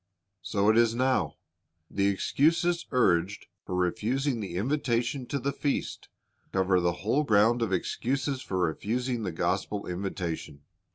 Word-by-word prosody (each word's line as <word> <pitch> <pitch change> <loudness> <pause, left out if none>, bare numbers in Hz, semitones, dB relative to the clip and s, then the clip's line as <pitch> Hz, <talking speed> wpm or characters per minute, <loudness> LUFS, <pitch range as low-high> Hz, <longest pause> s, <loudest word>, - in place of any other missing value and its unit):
So 100 +2 0
it 110 - +4
is 115 -1 +3
now. 130 +1 +1 0.5
The 100 +3 0
excuses 165 - +1
urged 95 -6 +2 0.2
for 90 - -4
refusing 115 +8 0
the 95 -5 -5
invitation 125 +2 0
to 140 - -2
the 140 +1 -2
feast 140 +1 -2 0.4
cover 95 -1 +2
the 85 0 +2
whole 130 +7 +3
ground 115 -1 +4
of 115 - 0
excuses 130 - -1
for 95 - -3
refusing 115 +8 -1
the 95 -4 -2
gospel 100 +5 -1
invitation. 90 -5 -4
110 Hz, 135 wpm, -28 LUFS, 95-130 Hz, 0.5 s, it